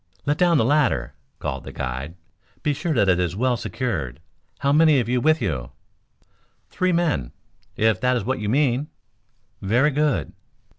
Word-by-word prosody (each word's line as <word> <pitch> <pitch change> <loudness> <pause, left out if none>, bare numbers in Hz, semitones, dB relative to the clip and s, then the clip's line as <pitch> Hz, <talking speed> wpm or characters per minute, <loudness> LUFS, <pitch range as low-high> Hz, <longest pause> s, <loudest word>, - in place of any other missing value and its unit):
"Let 145 +2 0
down 175 -2 +4
your 110 - +3
ladder," 125 - +1 0.2
called - - -4
the - - -8
guide. 65 +5 -5 0.5
"Be 150 -2 +1
sure 160 +4 -3
that 105 -5 +3
it 90 -2 +3
is 90 -1 -1
well 125 +3 +1
secured. 80 - -3 0.4
How 140 0 +2
many 155 -1 +5
have 120 - 0
you 125 0 +1
with 155 +2 +2
you?" 65 -10 -3 1.0
"Three 185 0 +1
men, 165 - 0 0.4
if 110 -3 +2
that 125 0 +2
is - - -3
what 130 +2 -1
you 105 -1 -2
mean." 135 +2 +1 0.7
"Very 120 +9 +2
good." 140 - 0
125 Hz, 165 wpm, -23 LUFS, 90-150 Hz, 1.0 s, many